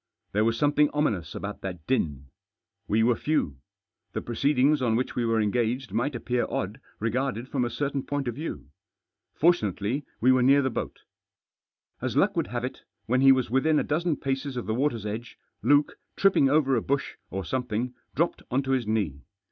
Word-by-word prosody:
There 105 +2 +2
was 115 0 +1
something 145 +1 +3
ominous 100 - 0
about 100 +1 -5
that 90 -4 -6
din. 70 - -1 0.6
We 110 +1 +3
were 120 +1 +4
few. 130 - -1 0.6
The - - -2
proceedings 140 +4 +2
on 115 -3 +2
which 125 +3 -1
we 120 - 0
were 115 -1 +2
engaged 120 +4 0
might 130 +3 0
appear 125 +1 -1
odd 105 +8 -3 0.2
regarded 120 +2 -1
from 130 -2 -1
a 120 - 0
certain 140 +3 -2
point 145 0 -3
of 120 - -1
view. 145 - -6 0.6
Fortunately, 135 - +1 0.2
we 130 +3 +5
were 130 0 +4
near 140 +3 +5
the 130 - 0
boat - - -4 1.0
As - - -2
luck - - +3
would - - 0
have 120 +4 -3
it, 130 - -6 0.2
when 125 +3 +2
he 135 0 +8
was 130 -3 +2
within 150 +4 +3
a - - +2
dozen 160 +1 0
paces 135 0 -3
of 120 - -3
the 110 - -1
water's 120 -3 0
edge, 110 +3 -5 0.2
Luke, 145 0 +3 0.2
tripping 190 -8 +4
over 140 -2 +3
a 115 - +1
bush, 140 +3 -1 0.2
or 95 -1 -4
something, 125 +1 -2 0.2
dropped 170 +3 0
on 135 +3 +1
to 135 - -2
his 130 -4 +1
knee. 100 -11 -1
125 Hz, 190 wpm, -27 LUFS, 110-140 Hz, 1.0 s, he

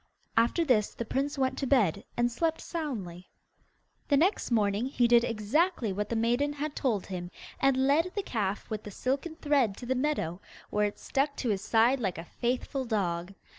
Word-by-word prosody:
After 235 +9 +3
this 220 -7 +2
the 235 - -4
prince 280 +5 -1
went 260 -1 0
to 275 - -1
bed 205 - +2
and 240 0 +2
slept 320 +6 0
soundly. 205 - -5 0.8
The 285 - +4
next 360 +8 +2
morning 215 0 +1
he 245 -3 +2
did 235 0 +6
exactly 235 - +1
what 210 +2 -3
the 235 - -1
maiden 240 +6 +1
had 295 +1 -4
told 225 -8 0
him, 180 -2 -5 0.3
and 265 -1 +3
led 320 +6 +3
the 405 - -1
calf 205 - -2
with 215 -1 -2
the 210 - -8
silken 270 - -2
thread 280 - +1
to 245 - -8
the 260 - +1
meadow, 250 - -1 0.3
where 210 0 +2
it 205 - -7
stuck 280 +1 -1
to 245 - -2
his 200 -3 0
side 235 +6 +3
like 195 -7 -2
a 165 - -6
faithful 255 - -2
dog. 195 -5 -2
240 Hz, 190 wpm, -29 LUFS, 210-280 Hz, 0.8 s, did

